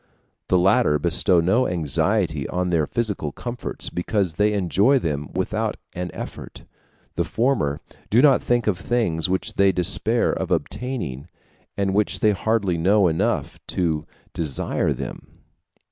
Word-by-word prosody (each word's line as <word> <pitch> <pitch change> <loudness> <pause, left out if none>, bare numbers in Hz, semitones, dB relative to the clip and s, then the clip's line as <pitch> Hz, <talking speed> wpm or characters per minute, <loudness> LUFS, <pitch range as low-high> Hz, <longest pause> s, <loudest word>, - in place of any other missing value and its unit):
The 90 - +3
latter 95 -2 +3
bestow 85 +4 +2
no 110 +10 +2
anxiety 80 - 0
on 90 0 -1
their 80 -3 +1
physical 105 -10 -2
comforts, 120 - -6
because 90 0 -1
they 105 +4 +2
enjoy 100 - +3
them 75 - -2
without - - -2 0.2
an 90 0 -4
effort; - - -8 0.5
the - - 0
former 110 - 0 0.3
do 115 - +4
not 135 -1 +5
think 120 -2 +1
of 100 -5 0
things 95 -9 0
which 95 0 -1
they 100 0 +5
despair 105 +6 +2
of - - -3
obtaining, 105 - -3 0.5
and 100 -1 0
which 105 +1 +1
they 105 - +4
hardly 100 -3 0
know 100 +3 +4
enough 80 -1 -1
of - - -35
to 80 -4 0 0.3
desire 75 -5 -1
them. - - -6
95 Hz, 145 wpm, -23 LUFS, 80-110 Hz, 0.5 s, not